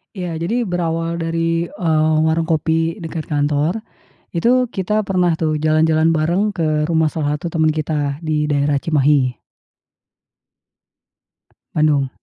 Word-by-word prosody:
Iya 175 -3 -4
jadi 230 +9 -1
berawal 170 -3 -2
dari, 165 +1 -1
eee, 160 -3 +1
warung 160 0 +1
kopi 165 +1 0
dekat 160 -1 -5
kantor, 150 +7 0 0.5
itu 250 +8 +3
kita 210 +2 -1
pernah 180 -4 +1
tuh 155 -2 0
jalan-jalan 155 +1 +2
bareng 170 +6 +1
ke 155 -5 0
rumah 160 -1 +3
salah 150 -1 -1
satu 170 - -7
teman 160 -1 +3
kita 150 -2 -2
di 150 -1 0
daerah 145 0 +1
Cimahi. 140 -3 +1 2.4
Bandung. 150 -3 +2
160 Hz, 125 wpm, -19 LUFS, 150-170 Hz, 2.4 s, itu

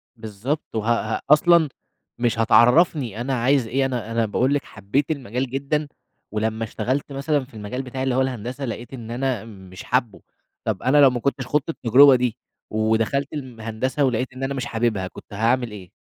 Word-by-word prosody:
بالضبط، 110 +6 -5
وها 110 0 0
ها - - -11
أصلًا 165 +1 +5 0.5
مش 120 -1 0
هتعرّفني 120 - +4
أنا 135 +2 -2
عايز 130 0 +2
إيه، 135 +4 +1
أنا 120 -4 -3
أنا 115 0 +1
باقول 125 +6 +1
لِك 145 - 0
حبيت 110 +9 -2
المجال 130 -3 -3
جدًا، 140 +3 -1 0.4
ولمّا 110 +1 -1
اشتغلت 125 +6 -2
مثلًا 140 0 -1
في 130 - -24
المجال 110 +4 -5
بتاعي 130 0 -5
اللي 130 -2 0
هو 130 - +3
الهندسة 130 +1 -3
لقيت 120 +1 -6
إن 115 -3 -7
أنا 125 -3 -2
مش 95 -4 -11
حابه، 120 -4 -1 0.4
طب 105 -4 -2
أنا 130 +4 +3
لو 140 - +8
ما 125 -1 -2
كنتش 130 0 -2
خُضت 150 +2 0
التجربة 135 -1 +6
دي 125 -2 -1 0.3
ودخلت 110 +6 0
الم 130 -6 -7
هندسة 115 +6 -1
ولقيت 125 0 -1
إن 130 +1 -7
أنا 135 +1 -1
مش 130 -3 -3
حاببها 110 -5 -1
كنت 95 - -13
هاعمل 115 +3 +1
إيه؟ 95 -4 -10
125 Hz, 185 wpm, -23 LUFS, 110-135 Hz, 0.5 s, لو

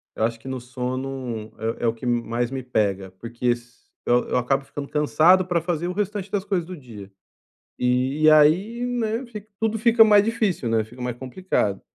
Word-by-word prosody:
eu - - -2
acho 115 0 0
que 115 - -13
no 130 -1 -4
sono, 125 -2 -5 0.3
é - - -7
é - - +3
o 115 - +2
que 115 +2 -10
m 120 -1 +1
mais 120 +1 -2
me 135 0 -5
pega, 100 -6 -1
porque 120 +1 -4
s 120 0 -7 0.2
eu 120 0 +2
eu - - +1
acabo 135 +2 +1
ficando 140 0 -7
cansado 155 +6 +4
pra 175 -2 0
fazer 170 0 -2
o 180 - -3
restante 205 0 -3
das 200 -1 -1
coisas 190 -5 -1
do 185 +2 -8
dia. 110 -8 -11 0.7
E 130 +5 +2
aí, 180 +11 +4
né, 235 0 -2
fica, 215 -3 -10
tudo 225 0 0
fica 230 0 +6
mais 210 -2 +6
difícil, 215 - 0
né, 115 -1 +1
fica 120 +4 -15
mais 125 -1 -3
complicado, 130 - -2
135 Hz, 200 wpm, -23 LUFS, 120-190 Hz, 0.7 s, fica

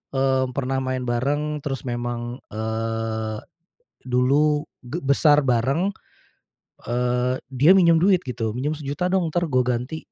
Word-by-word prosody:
eee, 135 -1 +2
pernah 135 -1 -1
main 130 -1 -2
bareng, 145 +5 -1
terus 135 -4 -4
memang 120 0 -4
eee, 110 0 -3 0.7
dulu 145 +4 +2 0.2
ge 145 +8 -4
besar 145 +2 +4
bareng, 135 +8 +1 1.0
eee, 125 +1 0 0.2
dia 140 +8 +5
minjem 170 -3 +5
duit, 185 +1 +4
gitu. 115 -4 -3
"Minjem 145 +5 -2
Rp1.000.000 145 +4 -2
dong, 180 -4 0
entar 175 - +1
gue 130 -3 +2
ganti, 125 +5 -2
130 Hz, 130 wpm, -23 LUFS, 120-150 Hz, 1.0 s, dia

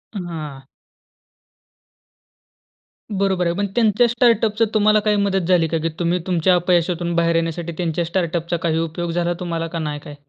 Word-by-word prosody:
हां. 160 -7 -6 2.6
बरोबर 190 -2 +1
आहे. 170 - -1
पण 200 +1 -1
त्यांच्या 230 0 +3
स्टार्टअपचं 230 -2 +2
तुम्हाला 215 0 +4
काही 210 -1 +3
मदत 195 -3 0
झाली 175 -3 +3
का? 165 - -1
की 165 - +1
तुम्ही 175 +1 +1
तुमच्या 180 0 +3
अपयशातून 175 -1 +1
बाहेर 170 0 +2
येण्यासाठी 165 +1 -2
त्यांच्या 170 -1 -1
स्टार्टअपचा 170 -1 -1
काही 160 -1 +1
उपयोग 165 +1 -3
झाला 175 +1 0
तुम्हाला 165 -2 -3
का 165 0 -5
नाही 150 -2 -3
काय? 145 0 -11
175 Hz, 150 wpm, -20 LUFS, 165-195 Hz, 2.6 s, तुम्हाला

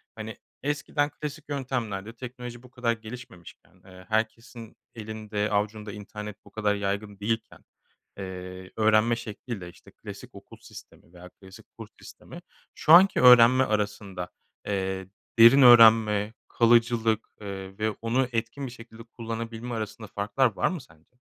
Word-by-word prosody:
hani, 110 0 -8 0.3
eskiden 145 0 -1
klasik 150 0 -8
yöntemlerle 115 -7 -4
teknoloji 125 0 -9
bu 125 - -16
kadar 125 -2 0
gelişmemişken, 110 -7 -12
eee, 90 -1 -14
herkesin 115 +1 -3 0.2
elinde 110 -1 -4
avucunda 105 +1 -2
internet 105 0 -9
bu - - -17
kadar 105 -1 0
yaygın 100 0 -4
değilken, 115 +2 -4 0.5
eee, 95 -1 -8
öğrenme 110 +1 +3
şekliyle, 110 -4 -7
işte, - - -18
klasik - - -11
okul - - -13
sistemi 85 - -15
veya 90 0 -13
klasik 95 +1 -16
kurs - - -10
sistemi - - -12 0.3
şu 155 - +4
anki 190 +3 +7
öğrenme 125 +1 +8
arasında, 100 -5 -3 0.4
eee, 95 -2 -2 0.3
derin 120 +5 +8
öğrenme, 110 -3 +7
kalıcılık, 115 -1 +2
eee, 95 -1 -8
ve 110 0 0
onu 125 +3 +1
etkin 115 +4 -3
bir - - -9
şekilde 115 -2 -13
kullanabilme 115 0 -6
arasında 110 0 -6
farklar 105 +4 0
var - - +1
mı 180 -4 -5
sence? 80 +3 -23
110 Hz, 135 wpm, -26 LUFS, 100-120 Hz, 0.5 s, öğrenme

